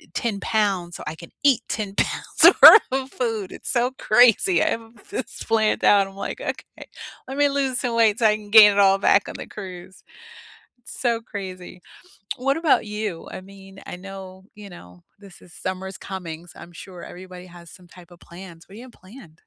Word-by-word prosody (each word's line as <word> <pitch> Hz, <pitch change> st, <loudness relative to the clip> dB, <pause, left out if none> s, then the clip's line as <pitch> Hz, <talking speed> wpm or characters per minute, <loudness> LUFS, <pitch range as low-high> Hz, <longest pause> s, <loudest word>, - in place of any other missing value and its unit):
10 215 Hz, -4 st, -2 dB
pounds 195 Hz, -6 st, -1 dB
so -, -, -10 dB
I 155 Hz, -, -5 dB
can 170 Hz, -, -13 dB
eat 265 Hz, -4 st, +3 dB
10 205 Hz, -3 st, -4 dB
pounds -, -, +3 dB
worth 440 Hz, -, +11 dB
of 265 Hz, 0 st, -3 dB
food. 225 Hz, -6 st, -4 dB
It's -, -, -9 dB
so 245 Hz, 0 st, 0 dB
crazy; 245 Hz, -, +3 dB
I 320 Hz, -, +1 dB
have 225 Hz, -3 st, -8 dB
this 420 Hz, -, -6 dB
planned 220 Hz, -1 st, 0 dB
out. 200 Hz, -1 st, +4 dB
I'm 195 Hz, -, -15 dB
like, 200 Hz, -, -6 dB
"Okay. -, -, -8 dB, 0.4 s
Let 270 Hz, +2 st, -7 dB
me 290 Hz, -, +3 dB
lose 270 Hz, -3 st, -1 dB
some 240 Hz, -2 st, -3 dB
weight 225 Hz, -2 st, +3 dB
so 230 Hz, -, +1 dB
I 210 Hz, -1 st, +4 dB
can 210 Hz, -1 st, -12 dB
gain 210 Hz, -1 st, +8 dB
it 200 Hz, -, -1 dB
all 195 Hz, -1 st, +4 dB
back 200 Hz, 0 st, +2 dB
on -, -, -9 dB
the -, -, -8 dB
cruise." 185 Hz, -2 st, -11 dB, 0.8 s
It's 245 Hz, -, -12 dB
so 235 Hz, -2 st, 0 dB
crazy. 185 Hz, -5 st, -9 dB, 0.6 s
What 275 Hz, +3 st, -1 dB
about 325 Hz, -8 st, +1 dB
you? 210 Hz, -5 st, -6 dB
I -, -, -8 dB
mean, 195 Hz, 0 st, -15 dB
I -, -, -7 dB
know, 190 Hz, 0 st, -11 dB
you 205 Hz, -1 st, -11 dB
know, 90 Hz, -, -15 dB, 0.2 s
this 195 Hz, -3 st, -16 dB
is 175 Hz, -, -18 dB
summer's 190 Hz, 0 st, -6 dB
coming, 175 Hz, -3 st, -8 dB
so -, -, -17 dB
I'm 175 Hz, -, -13 dB
sure 180 Hz, +1 st, -12 dB
everybody 180 Hz, 0 st, -12 dB
has 170 Hz, -1 st, -15 dB
some 180 Hz, -1 st, -17 dB
type 175 Hz, 0 st, -17 dB
of 175 Hz, -, -17 dB
plans. 175 Hz, -1 st, -14 dB
What -, -, -18 dB
do -, -, -11 dB
you 245 Hz, -, -11 dB
have 250 Hz, -, -15 dB
planned? 190 Hz, -3 st, -16 dB
200 Hz, 205 wpm, -22 LUFS, 185-230 Hz, 0.8 s, worth